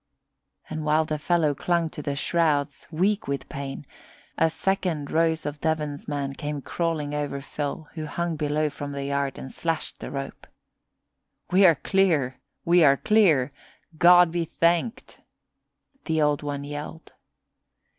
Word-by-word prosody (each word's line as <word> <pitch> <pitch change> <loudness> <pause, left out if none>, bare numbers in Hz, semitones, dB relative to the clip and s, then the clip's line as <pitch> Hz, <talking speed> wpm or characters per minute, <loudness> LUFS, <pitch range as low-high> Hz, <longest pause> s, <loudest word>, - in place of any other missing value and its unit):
And 155 0 -5
while 155 +1 +2
the 155 -1 -3
fellow 160 -2 +2
clung 170 +2 0
to - - -7
the 140 -1 -3
shrouds, 145 -2 0
weak 195 +6 0
with 140 0 -3
pain, 140 +1 -6 0.5
a 160 - +3
second 165 -3 -1
Rose 160 -1 +1
of 145 0 -5
Devon's 150 -2 -2
man 140 -2 -2
came 145 +1 -4
crawling 155 -1 -2
over 145 -1 -2
Phil 145 +3 -5
who 155 -2 -5
hung 170 +2 -2
below 150 0 0
from 145 0 -6
the 140 0 -4
yard, 140 -1 -1
and 130 - -7
slashed 165 -2 -3
the - - -6
rope. 135 0 -6 1.0
"We 190 +1 +7
are 165 - +6
clear! 155 -8 +1 0.3
We 175 0 +5
are 140 -2 +6
clear! 160 -12 +3 0.5
God 175 -1 +7
be 170 0 0
thanked!" 170 +7 0 0.9
the 160 -1 0
Old 150 -1 +2
One 145 -1 -4
yelled. 145 +3 -7
155 Hz, 145 wpm, -25 LUFS, 145-170 Hz, 1.0 s, We